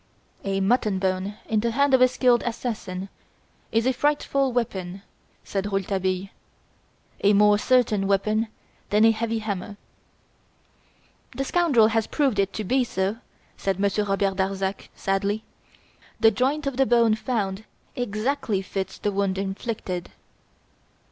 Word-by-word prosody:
"A 195 0 -1
mutton 210 -1 +2
bone 190 +1 -1
in 220 - +1
the 235 +2 0
hand 280 +4 +2
of 260 - +5
a 255 - +8
skilled 245 -1 +3
assassin 220 -6 -4 0.6
is 225 +1 +2
a 260 - +3
frightful 275 -1 +1
weapon," 195 -6 -3 0.4
said 195 0 -3
Rouletabille, 190 -1 -1 0.9
"a 205 +1 +5
more 205 0 +5
certain 220 -5 +2
weapon 215 +3 +1 0.4
than 210 +2 +4
a 225 - +7
heavy 225 +1 -1
hammer." 205 -2 -4 1.6
"The 270 - -1
scoundrel 275 -8 +3
has 225 -1 0
proved 270 -8 +1
it 195 0 +2
to 215 - -3
be 255 +6 +2
so," 195 -2 -2 0.4
said 195 -1 -1
Monsieur 200 +1 +1
Robert 195 -1 0
Darzac, 195 0 -2
sadly. 200 +2 -1 0.8
"The 225 - +6
joint 270 +7 0
of 275 -2 -2
the 270 -1 +3
bone 235 -2 +4
found 215 -3 -2 0.3
exactly 240 -1 -1
fits 190 0 -4
the 205 - -1
wound 195 -1 0
inflicted. 195 -2 -4
210 Hz, 135 wpm, -25 LUFS, 195-240 Hz, 1.6 s, a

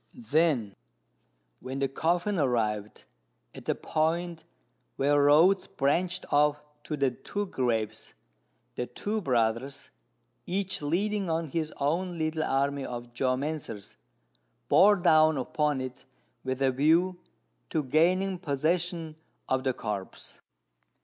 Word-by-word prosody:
Then 155 - +1 0.8
when 130 +1 -6
the 135 0 +1
coffin 175 +7 0
arrived 110 -6 -1 0.5
at - - -11
the - - 0
point 165 +1 -1 0.5
where 145 +1 +3
roads 170 +7 +5
branched 175 +7 0
off 150 0 +4 0.3
to 150 - -3
the 135 -2 +2
two 205 +10 -4
graves, 115 - -2 0.6
the 125 - -3
two 215 +1 -3
brothers, 125 - -1 0.6
each 190 0 -2
leading 195 +6 0
on 165 -1 -1
his 155 +2 -2
own 170 +5 -1
little 155 0 -1
army 140 0 0
of 120 -1 -7
geomancers, 130 - -2 0.7
bore 205 +2 +7
down 160 -4 +4
upon 145 +2 0
it 130 -1 -6 0.4
with 130 +1 -2
a 135 - +4
view 165 +7 +2 0.5
to 155 - 0
gaining 180 +7 +2
possession 165 +1 -1 0.3
of 130 0 0
the 130 - +2
corpse. 105 -5 -6
150 Hz, 115 wpm, -28 LUFS, 130-175 Hz, 0.8 s, bore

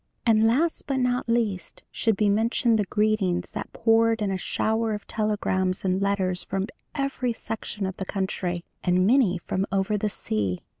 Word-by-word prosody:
"And 225 -1 +5
last 310 +9 +1
but 275 -2 0
not 250 -1 0
least 220 -6 -1
should 220 -3 +1
be 210 - +2
mentioned 225 +2 +2
the 205 - +1
greetings 195 -4 0
that - - -6
poured 225 -1 +3
in 200 - 0
a - - 0
shower 220 +3 0
of 210 - -8
telegrams 195 -4 -1
and 185 +1 +1
letters 190 -2 0
from 195 0 -2 0.3
every 275 -4 -1
section 215 -2 -5
of 190 -1 -4
the 190 - -4
country, 185 -3 -2 0.2
and 180 0 +3
many 220 -5 +4
from 190 +3 -2
over 195 +2 +1
the 210 - 0
sea. 105 - -2
210 Hz, 170 wpm, -25 LUFS, 190-225 Hz, 0.3 s, And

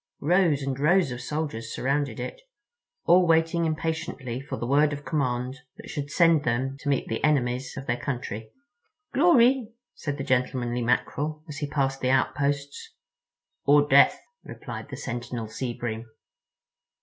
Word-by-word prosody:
Rows 165 -3 +2
and 135 -1 -3
rows 170 0 +3
of 125 0 -5
soldiers 135 -6 -4
surrounded 140 +2 -1
it, - - -6 0.6
all 180 +1 +5
waiting 165 +1 +3
impatiently 155 -6 -3
for 135 - -6
the - - -3
word 145 +3 +3
of 145 0 -7
command 130 -3 -1 0.2
that - - -11
should 145 -2 -4
send 165 -1 +4
them 130 +2 -1
to 145 - -3
meet 140 - 0
the 115 - -3
enemies 130 -3 +1
of 135 - -6
their 120 -1 0
country. 120 -5 -4 0.6
"Glory," 260 -7 +4 0.2
said 145 -2 -4
the 135 - -3
gentlemanly 125 -2 0
Mackerel, 145 +5 -1
as 150 -2 -7
he 145 -1 -3
passed 135 -2 0
the 130 - +1
outposts. 140 +2 -1 0.7
"Or 145 +1 +5
Death," 140 0 +6 0.2
replied - - -8
the - - -6
sentinel 120 -2 -5
Sea 120 +3 -4
Bream. 115 -1 -4
140 Hz, 150 wpm, -26 LUFS, 125-155 Hz, 0.7 s, Death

